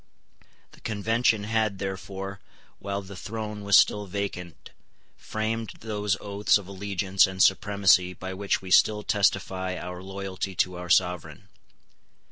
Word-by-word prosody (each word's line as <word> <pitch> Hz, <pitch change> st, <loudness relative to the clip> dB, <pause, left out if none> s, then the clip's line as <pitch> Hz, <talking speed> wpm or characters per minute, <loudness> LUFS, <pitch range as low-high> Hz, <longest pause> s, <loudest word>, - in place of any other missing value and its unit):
The -, -, -18 dB
Convention 110 Hz, 0 st, +1 dB
had 110 Hz, -1 st, 0 dB
therefore, 95 Hz, 0 st, -5 dB, 0.4 s
while 100 Hz, 0 st, -4 dB
the 95 Hz, +1 st, -10 dB
throne 105 Hz, +1 st, -5 dB
was 100 Hz, -1 st, +6 dB
still 105 Hz, -1 st, +3 dB
vacant, 90 Hz, -4 st, -5 dB, 0.4 s
framed 110 Hz, +1 st, -3 dB
those 105 Hz, -2 st, -1 dB
oaths 100 Hz, +1 st, +2 dB
of 100 Hz, -3 st, -10 dB
allegiance 100 Hz, -1 st, +1 dB
and 95 Hz, 0 st, -8 dB
supremacy 95 Hz, -2 st, +4 dB
by 95 Hz, +2 st, -6 dB
which 100 Hz, 0 st, -1 dB
we 95 Hz, -, -8 dB
still 105 Hz, +2 st, +5 dB
testify 95 Hz, -2 st, 0 dB
our 90 Hz, 0 st, -6 dB
loyalty 95 Hz, 0 st, -5 dB
to 90 Hz, +1 st, +1 dB
our 90 Hz, 0 st, -7 dB
Sovereign. 90 Hz, 0 st, +1 dB
100 Hz, 130 wpm, -26 LUFS, 95-105 Hz, 0.4 s, was